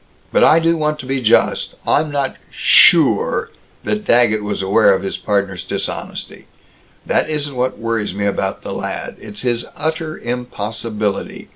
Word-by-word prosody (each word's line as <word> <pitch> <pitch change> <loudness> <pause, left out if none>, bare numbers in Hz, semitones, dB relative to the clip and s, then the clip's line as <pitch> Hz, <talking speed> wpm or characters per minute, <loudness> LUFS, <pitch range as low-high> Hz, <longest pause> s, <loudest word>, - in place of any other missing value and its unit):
But - - +3
I 160 - +6
do 165 0 +2
want 150 -1 0
to - - -11
be 135 0 -2
just. 115 -2 +2
I'm 155 +1 +2
not 140 -2 -2
sure - - +4 0.3
that 210 0 -2
Daggett 120 - +3
was 105 -1 -3
aware 100 +1 +4
of 95 - -4
his 95 - -4
partner's 100 -3 -1
dishonesty. - - -5 0.6
That - - +1
isn't 145 -3 -2
what 125 +1 -1
worries 115 -4 -2
me 100 0 -2
about 95 -1 -2
the - - -5
lad. - - -5
It's 105 -1 -9
his 120 -1 0
utter 155 +1 -3
impossibility. 110 -3 -4
120 Hz, 155 wpm, -18 LUFS, 105-150 Hz, 0.6 s, I